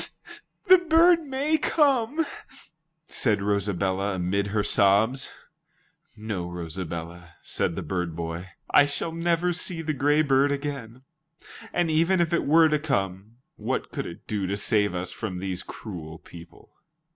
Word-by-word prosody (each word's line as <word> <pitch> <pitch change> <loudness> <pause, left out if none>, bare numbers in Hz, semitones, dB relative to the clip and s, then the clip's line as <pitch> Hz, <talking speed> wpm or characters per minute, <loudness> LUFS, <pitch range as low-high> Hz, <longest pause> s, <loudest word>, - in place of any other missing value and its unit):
"The 370 0 +8
bird 335 0 +5
may 285 +4 0
come," 290 0 +2 0.8
said 105 -5 +2
Rosabella 100 -1 0
amid 95 +3 -1
her 105 +1 0
sobs. 105 +8 +3 0.9
"No, 105 -5 -4
Rosabella," 85 0 -7
said 85 - -1
the 95 - -4
bird 85 0 -3
boy, 85 +2 -5 0.2
"I 145 - +6
shall 145 +3 -3
never 170 +1 0
see 170 -1 -2
the 155 -1 -1
gray 145 +2 +2
bird 140 0 +3
again. 135 -4 -5 0.7
And 175 -2 0
even 165 +4 +3
if 170 -1 +1
it 170 - +1
were 160 +2 +6
to 150 -1 +1
come, 105 -6 -3 0.2
what - - -3
could - - -4
it 85 - -10
do 100 -3 -2
to 100 +2 -2
save 105 -2 +1
us 90 +1 -4
from 95 -5 -5
these 95 0 -4
cruel 80 -7 -8
people?" 85 +1 -15
110 Hz, 145 wpm, -26 LUFS, -, 0.9 s, The